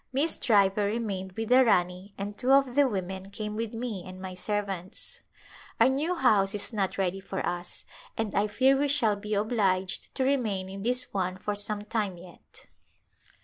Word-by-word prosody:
Miss 285 Hz, +5 st, +2 dB
Driver 200 Hz, -2 st, +3 dB
remained 200 Hz, -4 st, -3 dB
with 225 Hz, +2 st, -4 dB
the 255 Hz, +1 st, +7 dB
Rani 185 Hz, -2 st, +1 dB
and 205 Hz, +1 st, -4 dB
two 250 Hz, +5 st, +1 dB
of 275 Hz, -2 st, +4 dB
the 285 Hz, +1 st, +5 dB
women 190 Hz, -2 st, -4 dB
came 210 Hz, +1 st, -5 dB
with 225 Hz, 0 st, -3 dB
me 225 Hz, -6 st, -4 dB
and 185 Hz, +1 st, -10 dB
my 185 Hz, 0 st, -6 dB
servants. 195 Hz, -1 st, -4 dB, 0.6 s
Our -, -, +6 dB
new 300 Hz, +7 st, 0 dB
house 210 Hz, -, +3 dB
is 210 Hz, +3 st, -3 dB
not 195 Hz, -3 st, -1 dB
ready 190 Hz, 0 st, 0 dB
for 190 Hz, 0 st, -4 dB
us 175 Hz, 0 st, -4 dB, 0.3 s
and 220 Hz, -3 st, -2 dB
I 205 Hz, +1 st, +2 dB
fear 265 Hz, +5 st, +4 dB
we 285 Hz, +2 st, +1 dB
shall 255 Hz, -7 st, +3 dB
be 210 Hz, +1 st, -3 dB
obliged 195 Hz, -3 st, 0 dB
to 265 Hz, -, 0 dB
remain 220 Hz, -9 st, 0 dB
in 195 Hz, +1 st, -7 dB
this 250 Hz, +3 st, -1 dB
one 185 Hz, -1 st, -1 dB
for 210 Hz, +2 st, -3 dB
some 205 Hz, 0 st, -2 dB
time 210 Hz, -4 st, -2 dB
yet. 175 Hz, 0 st, -15 dB
205 Hz, 185 wpm, -28 LUFS, 190-235 Hz, 0.6 s, the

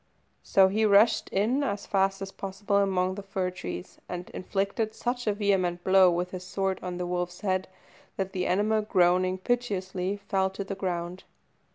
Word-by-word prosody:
So 195 Hz, -1 st, +5 dB
he 210 Hz, +3 st, 0 dB
rushed 210 Hz, +2 st, +4 dB
in 225 Hz, +8 st, +1 dB
as 200 Hz, -6 st, -2 dB
fast 195 Hz, 0 st, +1 dB
as 195 Hz, -, -7 dB
possible 195 Hz, +1 st, -2 dB
among 190 Hz, -2 st, +2 dB
the 200 Hz, -, -6 dB
fir 190 Hz, -2 st, -2 dB
trees, 90 Hz, -, -7 dB
and 180 Hz, 0 st, -6 dB
inflicted 200 Hz, +4 st, -2 dB
such 245 Hz, 0 st, -3 dB
a 210 Hz, -, +3 dB
vehement 190 Hz, -4 st, 0 dB
blow 190 Hz, -1 st, +6 dB
with 175 Hz, +1 st, -1 dB
his 185 Hz, -1 st, -6 dB
sword 190 Hz, 0 st, -2 dB
on 180 Hz, -1 st, -4 dB
the 180 Hz, -, -2 dB
wolf's 180 Hz, 0 st, -3 dB
head, 185 Hz, -2 st, 0 dB, 0.5 s
that 190 Hz, -1 st, -2 dB
the 180 Hz, -1 st, -1 dB
animal, 215 Hz, +3 st, +2 dB
groaning 185 Hz, -2 st, +2 dB
piteously, 195 Hz, -4 st, -2 dB
fell 195 Hz, -1 st, 0 dB
to 195 Hz, +1 st, -5 dB
the 195 Hz, -, -5 dB
ground. 180 Hz, -1 st, -4 dB
190 Hz, 175 wpm, -28 LUFS, 185-200 Hz, 0.5 s, blow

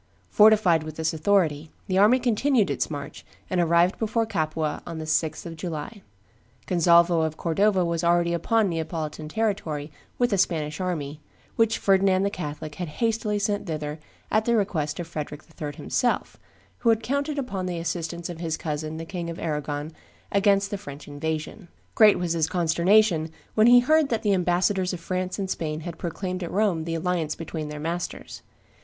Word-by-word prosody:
Fortified 210 Hz, -6 st, +5 dB
with 155 Hz, -1 st, -7 dB
this 160 Hz, +1 st, -1 dB
authority, 160 Hz, -3 st, +1 dB, 0.2 s
the 185 Hz, 0 st, +1 dB
army 215 Hz, +6 st, +6 dB
continued 245 Hz, -2 st, +2 dB
its -, -, -1 dB
march, 145 Hz, -2 st, -7 dB, 0.3 s
and 180 Hz, -1 st, +2 dB
arrived 170 Hz, +2 st, +3 dB
before 225 Hz, +1 st, 0 dB
Capua 155 Hz, -6 st, -2 dB
on 165 Hz, -2 st, -7 dB
the 160 Hz, -, -5 dB
6th 160 Hz, +1 st, -1 dB
of 165 Hz, -1 st, -6 dB
July. 165 Hz, +5 st, -6 dB, 0.6 s
Gonzalvo 170 Hz, -1 st, +4 dB
of 160 Hz, 0 st, -2 dB
Cordova 185 Hz, +2 st, +2 dB
was 170 Hz, -1 st, -1 dB
already 170 Hz, 0 st, +3 dB
upon 215 Hz, +6 st, +2 dB
Neapolitan 160 Hz, -2 st, -4 dB
territory 160 Hz, -8 st, -2 dB, 0.3 s
with 245 Hz, -3 st, +2 dB
a 200 Hz, -, +2 dB
Spanish 155 Hz, -2 st, 0 dB
army, 155 Hz, -5 st, -3 dB, 0.3 s
which 225 Hz, -1 st, +2 dB
Ferdinand 195 Hz, -1 st, +3 dB
the 200 Hz, -, 0 dB
Catholic 150 Hz, -3 st, -6 dB
had 175 Hz, -, -2 dB
hastily 220 Hz, -2 st, 0 dB
sent 205 Hz, 0 st, -1 dB
thither 150 Hz, -1 st, -4 dB, 0.3 s
at 215 Hz, 0 st, +2 dB
the 235 Hz, -, +2 dB
request 160 Hz, -8 st, -1 dB
of 175 Hz, -, -3 dB
Frederick 150 Hz, -2 st, -6 dB, 0.2 s
III. 145 Hz, -1 st, -4 dB
himself, 245 Hz, -, -1 dB, 0.4 s
who 235 Hz, -, +2 dB
had 225 Hz, 0 st, +3 dB
counted 280 Hz, +3 st, -1 dB
upon 200 Hz, -9 st, -3 dB
the 175 Hz, -1 st, -3 dB
assistance 170 Hz, 0 st, -3 dB
of 175 Hz, -2 st, -7 dB
his 165 Hz, -2 st, -2 dB
cousin 155 Hz, 0 st, -4 dB
the 165 Hz, -, -6 dB
King 170 Hz, -1 st, -5 dB
of 165 Hz, -, -6 dB
Arragon 150 Hz, -1 st, -3 dB, 0.4 s
against 200 Hz, 0 st, +3 dB
the 205 Hz, -, -3 dB
French 145 Hz, -7 st, -10 dB
invasion. 155 Hz, +5 st, -4 dB, 0.3 s
Great 215 Hz, -2 st, +6 dB
was 175 Hz, -2 st, -1 dB
his 160 Hz, -2 st, +1 dB
consternation 175 Hz, 0 st, +3 dB, 0.2 s
when 215 Hz, +1 st, +5 dB
he 245 Hz, 0 st, +8 dB
heard 310 Hz, +3 st, +3 dB
that 230 Hz, -1 st, -1 dB
the 205 Hz, -2 st, +3 dB
ambassadors 185 Hz, +1 st, +1 dB
of 180 Hz, -, -5 dB
France 185 Hz, +1 st, -3 dB
and 195 Hz, -2 st, -2 dB
Spain 155 Hz, -4 st, -3 dB
had 170 Hz, 0 st, -7 dB
proclaimed 185 Hz, +2 st, -4 dB
at 175 Hz, -, -4 dB
Rome 190 Hz, -6 st, +1 dB
the 165 Hz, 0 st, -2 dB
alliance 165 Hz, -2 st, -1 dB
between 160 Hz, -2 st, -5 dB
their 150 Hz, 0 st, -6 dB
masters. 170 Hz, +3 st, -5 dB
175 Hz, 175 wpm, -25 LUFS, 160-205 Hz, 0.6 s, he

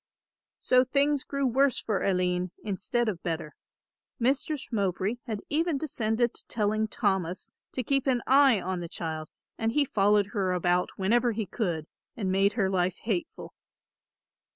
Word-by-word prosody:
So 255 Hz, 0 st, +4 dB
things 280 Hz, +2 st, +1 dB
grew 275 Hz, -1 st, -2 dB
worse 265 Hz, +2 st, +3 dB
for 215 Hz, -4 st, -1 dB
Aline 180 Hz, -1 st, +1 dB
instead 215 Hz, +4 st, -1 dB
of 185 Hz, -6 st, -2 dB
better. 165 Hz, -2 st, -3 dB, 0.6 s
Mistress 275 Hz, +3 st, 0 dB
Mowbray 200 Hz, +1 st, 0 dB
had 215 Hz, -3 st, -3 dB
even 320 Hz, 0 st, +1 dB
descended 235 Hz, -5 st, 0 dB
to -, -, -11 dB
telling 215 Hz, 0 st, 0 dB
Thomas 190 Hz, -1 st, -1 dB, 0.2 s
to 255 Hz, -, -2 dB
keep 275 Hz, +3 st, 0 dB
an 250 Hz, -3 st, +2 dB
eye 270 Hz, -4 st, +5 dB
on 185 Hz, 0 st, -3 dB
the 170 Hz, -1 st, -6 dB
child 160 Hz, -2 st, -5 dB, 0.3 s
and 225 Hz, 0 st, 0 dB
he 295 Hz, +1 st, +3 dB
followed 205 Hz, -3 st, +2 dB
her 190 Hz, -4 st, 0 dB
about 180 Hz, 0 st, +1 dB
whenever 235 Hz, +5 st, +2 dB
he 215 Hz, 0 st, -2 dB
could, 175 Hz, -7 st, -2 dB, 0.3 s
and 195 Hz, -5 st, -1 dB
made 195 Hz, +2 st, +3 dB
her 200 Hz, -5 st, +1 dB
life 185 Hz, -1 st, 0 dB
hateful. 205 Hz, -6 st, -3 dB
215 Hz, 155 wpm, -28 LUFS, 185-250 Hz, 0.6 s, eye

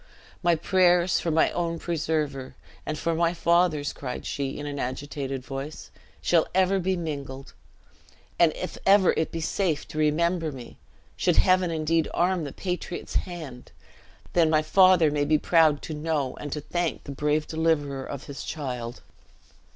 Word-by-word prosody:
"My 175 Hz, -2 st, +3 dB
prayers 180 Hz, +1 st, +3 dB
for 170 Hz, -, -2 dB
my 160 Hz, 0 st, +3 dB
own 170 Hz, -1 st, -2 dB
preserver, 155 Hz, -5 st, -2 dB, 0.3 s
and 155 Hz, -, -2 dB
for 165 Hz, +2 st, -1 dB
my 170 Hz, +1 st, +1 dB
father's," 170 Hz, -4 st, +2 dB
cried 125 Hz, -3 st, -6 dB
she, 135 Hz, -1 st, -3 dB
in 145 Hz, -, -6 dB
an 145 Hz, -1 st, -4 dB
agitated 135 Hz, 0 st, -4 dB
voice, 135 Hz, +3 st, -7 dB, 0.3 s
"shall 165 Hz, -2 st, +3 dB
ever 190 Hz, +1 st, +3 dB
be 185 Hz, +1 st, 0 dB
mingled. 140 Hz, -5 st, -6 dB, 0.9 s
And, 170 Hz, -2 st, +6 dB
if 185 Hz, -, -6 dB
ever 195 Hz, -1 st, +5 dB
it 160 Hz, -, -1 dB
be 165 Hz, -, -4 dB
safe 160 Hz, -2 st, -1 dB
to 155 Hz, -, -5 dB
remember 165 Hz, +2 st, +1 dB
me 125 Hz, -4 st, -11 dB, 0.4 s
should -, -, +1 dB
Heaven 185 Hz, -1 st, +4 dB
indeed 160 Hz, 0 st, +1 dB
arm 180 Hz, -2 st, +1 dB
the 140 Hz, -, -5 dB
patriot's 180 Hz, 0 st, -5 dB, 0.2 s
hand 150 Hz, -8 st, -9 dB, 0.6 s
then 165 Hz, -2 st, +4 dB
my 155 Hz, -1 st, +3 dB
father 180 Hz, -1 st, +5 dB
may 145 Hz, 0 st, 0 dB
be 155 Hz, +1 st, +3 dB
proud 155 Hz, -2 st, +3 dB
to 160 Hz, -, -5 dB
know 150 Hz, -3 st, -2 dB
and 145 Hz, -, -6 dB
to 150 Hz, -, -3 dB
thank 175 Hz, +2 st, -2 dB
the 140 Hz, -, -7 dB
brave 150 Hz, +2 st, 0 dB
deliverer 150 Hz, -4 st, 0 dB
of 140 Hz, 0 st, -7 dB
his 140 Hz, -2 st, -8 dB
child." 125 Hz, -5 st, -5 dB
155 Hz, 160 wpm, -26 LUFS, 145-175 Hz, 0.9 s, And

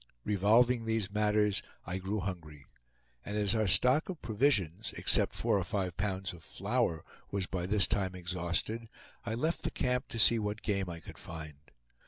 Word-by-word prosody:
Revolving 115 Hz, +4 st, +3 dB
these 110 Hz, -3 st, -1 dB
matters, 105 Hz, -1 st, +2 dB, 0.2 s
I 90 Hz, +3 st, -3 dB
grew 100 Hz, +2 st, -2 dB
hungry; 75 Hz, -7 st, -6 dB, 0.6 s
and 105 Hz, -, -4 dB
as 105 Hz, 0 st, +2 dB
our 110 Hz, -2 st, +1 dB
stock 125 Hz, -, +4 dB
of 180 Hz, -4 st, -5 dB
provisions, 105 Hz, -, +1 dB
except -, -, +3 dB
four 100 Hz, -, +1 dB
or -, -, -1 dB
five 95 Hz, -2 st, -2 dB
pounds 95 Hz, -1 st, -2 dB
of 85 Hz, -, -12 dB
flour, 100 Hz, -2 st, -1 dB, 0.2 s
was 100 Hz, -2 st, -1 dB
by 90 Hz, -1 st, -3 dB
this 105 Hz, -1 st, +4 dB
time 95 Hz, -3 st, -1 dB
exhausted, 90 Hz, +5 st, -2 dB, 0.4 s
I 110 Hz, -, -1 dB
left 160 Hz, +8 st, -1 dB
the -, -, -1 dB
camp 125 Hz, +1 st, -1 dB
to 115 Hz, -, -5 dB
see 115 Hz, +2 st, +5 dB
what 105 Hz, 0 st, -3 dB
game 100 Hz, -3 st, -1 dB
I 85 Hz, -1 st, -7 dB
could -, -, -12 dB
find. 80 Hz, -3 st, -9 dB
100 Hz, 175 wpm, -32 LUFS, 90-110 Hz, 0.6 s, see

